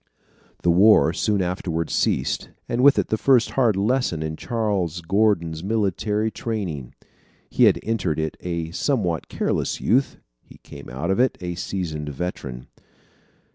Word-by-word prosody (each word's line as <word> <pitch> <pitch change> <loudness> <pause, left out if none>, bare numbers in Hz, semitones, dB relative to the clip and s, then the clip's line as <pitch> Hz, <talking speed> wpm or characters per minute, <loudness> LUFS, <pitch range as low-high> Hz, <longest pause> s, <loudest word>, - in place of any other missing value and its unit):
The 85 - +4
war 95 -2 +5
soon 100 +1 0
afterwards 85 -2 -2
ceased, - - 0 0.2
and 120 - -1
with 140 +1 +6
it - - 0
the 110 - 0
first 130 -4 +3
hard 120 -6 +2
lesson 100 -5 0
in 80 0 -3
Charles 100 -6 -2
Gordon's 85 -3 +1
military 105 +1 0
training. 90 - -4 0.6
He - - +4
had - - +4
entered 95 -9 -1
it 80 -1 -2
a 85 -2 -4
somewhat 90 - -1
careless - - -1
youth. 130 +4 +1 0.2
He - - -17
came - - -11
out 70 +9 -3
of 95 - 0
it 130 0 +2
a 90 -1 -4
seasoned 85 -4 -4
veteran. 70 -5 -5
95 Hz, 145 wpm, -23 LUFS, 80-110 Hz, 0.6 s, with